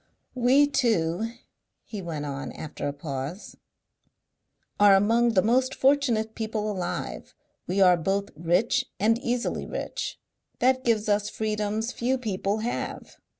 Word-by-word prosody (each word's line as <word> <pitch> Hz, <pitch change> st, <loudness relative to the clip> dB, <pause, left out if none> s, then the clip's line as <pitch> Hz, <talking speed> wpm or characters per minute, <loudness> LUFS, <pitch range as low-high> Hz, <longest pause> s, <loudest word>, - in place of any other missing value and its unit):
"We 255 Hz, +3 st, +4 dB
two," 225 Hz, -, 0 dB, 0.5 s
he 210 Hz, -3 st, -7 dB
went 160 Hz, -4 st, -4 dB
on, 140 Hz, 0 st, -5 dB
after 155 Hz, -, -5 dB
a -, -, -1 dB
pause, 145 Hz, +5 st, -6 dB, 1.2 s
"are 205 Hz, -1 st, +7 dB
among 230 Hz, +4 st, +3 dB
the 185 Hz, -, +5 dB
most 255 Hz, +4 st, +2 dB
fortunate 255 Hz, -6 st, +2 dB
people 215 Hz, -1 st, -2 dB
alive. 185 Hz, -3 st, -5 dB, 0.3 s
We 195 Hz, +2 st, +1 dB
are 180 Hz, -2 st, +6 dB
both 195 Hz, +4 st, -1 dB
rich 180 Hz, -, +1 dB, 0.2 s
and 225 Hz, +3 st, +3 dB
easily 245 Hz, -1 st, -2 dB
rich. -, -, -4 dB, 0.4 s
That 260 Hz, +1 st, +2 dB
gives 225 Hz, -3 st, +1 dB
us 205 Hz, 0 st, +1 dB
freedoms 215 Hz, +1 st, -2 dB
few 255 Hz, +2 st, 0 dB
people 210 Hz, -2 st, -2 dB
have. 240 Hz, -, -4 dB
215 Hz, 130 wpm, -26 LUFS, 185-240 Hz, 1.2 s, are